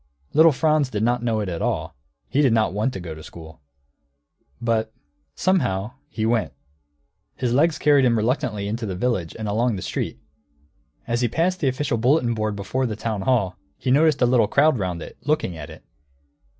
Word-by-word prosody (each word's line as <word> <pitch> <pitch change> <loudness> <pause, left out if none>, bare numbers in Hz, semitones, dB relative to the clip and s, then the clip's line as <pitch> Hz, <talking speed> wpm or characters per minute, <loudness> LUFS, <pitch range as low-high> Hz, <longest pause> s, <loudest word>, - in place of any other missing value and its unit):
Little 160 +2 +7
Franz 155 -1 +2
did 105 -3 -2
not 120 +1 +1
know 115 -2 0
it 105 - -3
at 85 -2 -4
all. - - -2 0.3
He 145 - +1
did 135 -6 +4
not 110 -5 +2
want 110 +6 0
to - - -5
go 85 -3 -6
to 80 - -10
school. 80 -1 -12 1.0
But, 115 -1 0 0.4
somehow, 110 - 0 0.2
he 110 -6 -2
went. 110 - 0 0.8
His 125 -2 -1
legs 155 +4 +3
carried 145 -2 +4
him 120 -2 +3
reluctantly 110 -3 -1
into 110 +2 -3
the 95 - -3
village 95 -6 -1
and 110 -1 -4
along 115 +3 +1
the 95 - -5
street. - - -3 0.9
As 120 +1 -1
he 120 - +3
passed 175 +9 0
the 145 - 0
official 130 -2 0
bulletin 125 0 +2
board 110 -2 -2
before 125 +6 -2
the 110 - -3
town 110 -2 -3
hall, 100 -5 0 0.2
he 130 - -1
noticed 150 -1 +4
a - - +6
little 120 -3 +3
crowd 140 +3 +3
round 90 -4 -3
it, - - -11
looking 150 - -1
at 75 -2 -8
it. - - -12
115 Hz, 190 wpm, -23 LUFS, 105-130 Hz, 1.0 s, Little